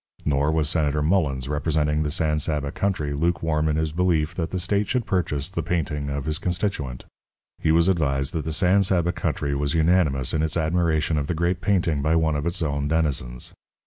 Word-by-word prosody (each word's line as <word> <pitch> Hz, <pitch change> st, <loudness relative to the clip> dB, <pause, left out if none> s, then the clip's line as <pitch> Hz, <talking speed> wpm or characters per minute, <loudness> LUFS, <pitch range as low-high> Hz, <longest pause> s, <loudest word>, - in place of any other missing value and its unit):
Nor 75 Hz, +1 st, +2 dB
was 80 Hz, -2 st, +1 dB
Senator 75 Hz, -2 st, 0 dB
Mullens, 75 Hz, -7 st, +1 dB
representing 75 Hz, 0 st, 0 dB
the 75 Hz, -, 0 dB
San 75 Hz, -1 st, 0 dB
Saba 75 Hz, -1 st, -2 dB
country, 85 Hz, -8 st, -1 dB
lukewarm 80 Hz, 0 st, 0 dB
in 75 Hz, -, +1 dB
his 80 Hz, 0 st, -1 dB
belief 85 Hz, -2 st, +1 dB
that 85 Hz, -1 st, -3 dB
the 95 Hz, -, -3 dB
state 100 Hz, +3 st, 0 dB
should 125 Hz, -3 st, 0 dB
purchase 75 Hz, -6 st, -1 dB
the 95 Hz, -3 st, -3 dB
painting 75 Hz, -4 st, -2 dB
of 70 Hz, -1 st, -3 dB
his 75 Hz, 0 st, -1 dB
constituent. 90 Hz, -9 st, -2 dB, 0.5 s
He 80 Hz, -, +1 dB
was 85 Hz, +2 st, +4 dB
advised 70 Hz, -7 st, +1 dB
that 80 Hz, -, -2 dB
the 80 Hz, -, -2 dB
San 95 Hz, +4 st, +3 dB
Saba 90 Hz, -3 st, +1 dB
country 70 Hz, -4 st, -2 dB
was 70 Hz, +1 st, -1 dB
unanimous 80 Hz, -6 st, +2 dB
in 80 Hz, -, +1 dB
its 80 Hz, +1 st, 0 dB
admiration 80 Hz, -1 st, +1 dB
of 70 Hz, -, -3 dB
the 85 Hz, -, -1 dB
great 85 Hz, +2 st, 0 dB
painting 85 Hz, -7 st, +1 dB
by 80 Hz, +3 st, +2 dB
one 80 Hz, -2 st, +2 dB
of 75 Hz, +3 st, -2 dB
its 85 Hz, +1 st, -1 dB
own 70 Hz, -1 st, -1 dB
denizens. 70 Hz, -6 st, -1 dB
80 Hz, 200 wpm, -24 LUFS, 75-85 Hz, 0.5 s, was